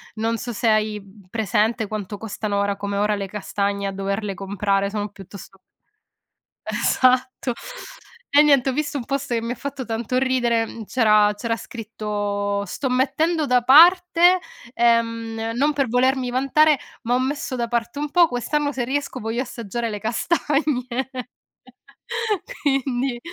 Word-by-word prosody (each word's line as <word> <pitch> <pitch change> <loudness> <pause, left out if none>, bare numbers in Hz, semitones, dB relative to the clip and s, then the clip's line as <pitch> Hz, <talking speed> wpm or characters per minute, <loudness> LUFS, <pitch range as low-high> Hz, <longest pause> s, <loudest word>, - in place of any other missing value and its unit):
non 225 +1 -1
so 240 - -5
se 235 +1 -2
hai, 215 -1 +2
mhmm, 195 -1 -18
presente 220 +2 0
quanto 205 -1 -5
costano 210 -1 -3
ora 200 0 0
come 200 0 -4
ora 210 +1 +2
le 200 -1 -3
castagne, 200 0 -2
a 195 - -1
doverle 195 +1 -3
comprare, 195 +1 -1
sono 205 0 -3
piuttost 195 0 -12 1.1
esatto. 255 -1 +1 0.8
E 290 - +9
niente, 280 -3 +4
ho - - -1
visto 295 +1 -2
un 245 - -5
post 275 -1 -3
che 230 - 0
mi 230 - -3
ha - - -3
fatto 280 0 -6
tanto 230 +2 -2
ridere, 235 -4 0
c'era 215 -4 +4
c'era 230 +2 -2
scritto: 205 -3 -3
"Sto 265 +8 -3
mettendo 295 +6 +1
da 250 -2 +3
parte" 350 +6 +6 0.3
ehm, 230 -1 +1
"Non 290 +5 +2
per 275 -3 0
volermi 255 +1 +1
vantare, 275 +3 +3 0.2
ma 235 - 0
ho 250 - +3
messo 265 0 -2
da 240 -1 -1
parte 235 +3 -2
un 295 0 -2
po', 345 +2 +5
quest'anno 285 +3 -1
se 260 -4 -2
riesco 275 0 -3
voglio 225 +3 -2
assaggiare 235 -2 -4
le 210 - -4
castagne". 255 - -1 1.3
Quindi, 270 -3 0
235 Hz, 150 wpm, -22 LUFS, 210-265 Hz, 1.3 s, E